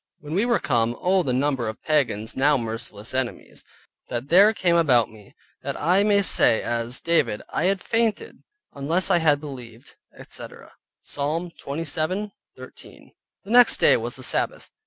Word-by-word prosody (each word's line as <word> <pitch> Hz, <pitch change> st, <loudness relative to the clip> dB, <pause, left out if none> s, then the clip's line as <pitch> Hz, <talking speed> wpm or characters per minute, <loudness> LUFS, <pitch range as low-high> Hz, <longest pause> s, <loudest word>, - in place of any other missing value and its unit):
When 150 Hz, -2 st, -8 dB
we 205 Hz, +7 st, +1 dB
were 235 Hz, -, +3 dB
come, 120 Hz, -2 st, 0 dB
Oh 185 Hz, +1 st, +2 dB
the 140 Hz, -7 st, -2 dB
number 130 Hz, -2 st, 0 dB
of 110 Hz, -, -9 dB
pagans 125 Hz, -8 st, 0 dB
(now 145 Hz, +2 st, +3 dB
merciless 115 Hz, -2 st, -6 dB
enemies) 130 Hz, -2 st, -4 dB, 0.5 s
that 125 Hz, +3 st, -5 dB
there 195 Hz, +5 st, +6 dB
came 185 Hz, -5 st, +1 dB
about 130 Hz, -10 st, +3 dB
me, 105 Hz, -2 st, -17 dB, 0.3 s
that -, -, -5 dB
I 180 Hz, +5 st, +3 dB
may 205 Hz, -1 st, +3 dB
say 115 Hz, -, +3 dB
as 120 Hz, +1 st, -2 dB
David, 165 Hz, -10 st, 0 dB
"I 160 Hz, -, -1 dB
had 195 Hz, 0 st, +1 dB
fainted, 225 Hz, -2 st, -1 dB, 0.3 s
unless 165 Hz, +7 st, 0 dB
I 175 Hz, -, +4 dB
had 150 Hz, -3 st, +3 dB
believed, 125 Hz, -6 st, -11 dB, 0.2 s
etc" -, -, -11 dB, 0.3 s
(Psalm 160 Hz, +5 st, -3 dB
27.13). 165 Hz, +7 st, -6 dB, 0.3 s
The 200 Hz, -, -9 dB
next 245 Hz, 0 st, +6 dB
day -, -, +5 dB
was -, -, -4 dB
the -, -, -9 dB
Sabbath. -, -, -1 dB
150 Hz, 155 wpm, -23 LUFS, 120-185 Hz, 0.5 s, there